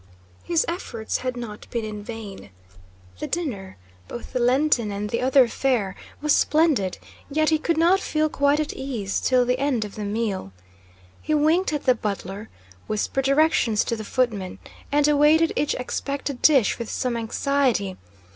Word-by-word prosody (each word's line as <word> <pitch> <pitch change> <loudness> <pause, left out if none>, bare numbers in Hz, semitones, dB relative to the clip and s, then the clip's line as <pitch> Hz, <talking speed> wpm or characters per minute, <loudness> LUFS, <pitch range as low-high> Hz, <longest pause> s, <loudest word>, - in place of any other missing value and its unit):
His 335 -2 +1
efforts 235 -10 -3
had 255 -1 -4
not 220 -3 -8
been 230 -2 -3
in 210 -1 -6
vain. 215 - -8 0.7
The - - -3
dinner, 230 - -4 0.3
both 240 - -8
the 255 - 0
Lenten 250 -2 +2
and 205 +1 -4
the 235 - -1
other 260 0 +5
fare, 230 -6 0 0.3
was 300 - +4
splendid, 300 - +2 0.3
yet 310 +2 +2
he 315 -1 +2
could 330 +1 0
not 345 +4 +4
feel 310 -4 0
quite 285 0 +2
at 305 - -2
ease 235 -8 -3
till 255 -1 +3
the 250 +1 0
end 265 -6 0
of 205 - -9
the 215 - -6
meal. 205 - -3 0.7
He 310 - 0
winked 315 +5 +2
at 295 -2 -3
the 255 - +6
butler, 205 -1 -5 0.4
whispered 215 +5 -1
directions 275 -6 +3
to 230 - -2
the 220 - -6
footmen, 215 -5 -1 0.3
and 290 0 +3
awaited 300 +2 +4
each 295 - 0
expected 275 +1 -4
dish 270 -10 +4
with 235 - -5
some 250 -2 -1
anxiety. 230 -3 0
255 Hz, 165 wpm, -24 LUFS, 215-295 Hz, 0.7 s, the